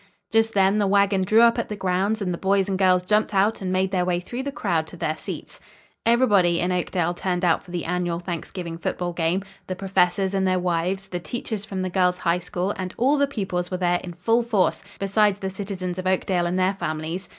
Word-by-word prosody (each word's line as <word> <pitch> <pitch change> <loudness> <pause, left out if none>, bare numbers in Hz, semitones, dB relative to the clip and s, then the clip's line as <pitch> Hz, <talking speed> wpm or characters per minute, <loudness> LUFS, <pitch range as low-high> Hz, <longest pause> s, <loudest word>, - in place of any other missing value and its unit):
Just 225 0 +2
then 195 +1 +4
the 205 - +2
wagon 200 0 +3
drew 215 +5 +4
up 235 0 +5
at - - -3
the 210 - -3
grounds 195 +3 0
and 180 -2 -1
the - - -4
boys 195 0 +2
and 195 - -1
girls 185 -1 +3
jumped 210 +1 +1
out 205 +3 +2
and 185 -1 -2
made 185 0 +1
their 185 -2 +1
way 180 -1 0
through 240 +8 -5
the 280 +1 -4
crowd 160 -11 -1
to 175 - -11
their 155 -1 -1
seats. - - -8 0.5
Everybody 205 -8 +4
in 180 - 0
Oakdale 175 -1 0
turned 180 0 -1
out 165 -2 +3
for - - -18
the 175 -1 -4
annual 175 -1 -1
Thanksgiving 170 -1 -5
football 175 +1 -2
game. 170 +3 0 0.2
The 185 - -3
professors 190 0 +1
and 190 -1 +1
their 185 0 +2
wives, 180 +2 -1
the 175 - -3
teachers 215 +1 -5
from 190 -3 -4
the 185 - -2
Girls' 180 -1 +2
High 175 0 +1
School 180 +2 -3
and 185 -1 -5
all 275 +4 +3
the 280 - +3
pupils 190 -8 -3
were 185 - -2
there 175 -1 +1
in 175 - -7
full 225 +7 +2
force, 220 -7 +1
besides 200 0 +2
the 190 -1 -4
citizens 185 -2 -5
of 185 - -3
Oakdale 185 -1 +1
and 180 +1 -1
their 185 +1 +2
families. 165 0 -4
185 Hz, 230 wpm, -24 LUFS, 180-200 Hz, 0.5 s, up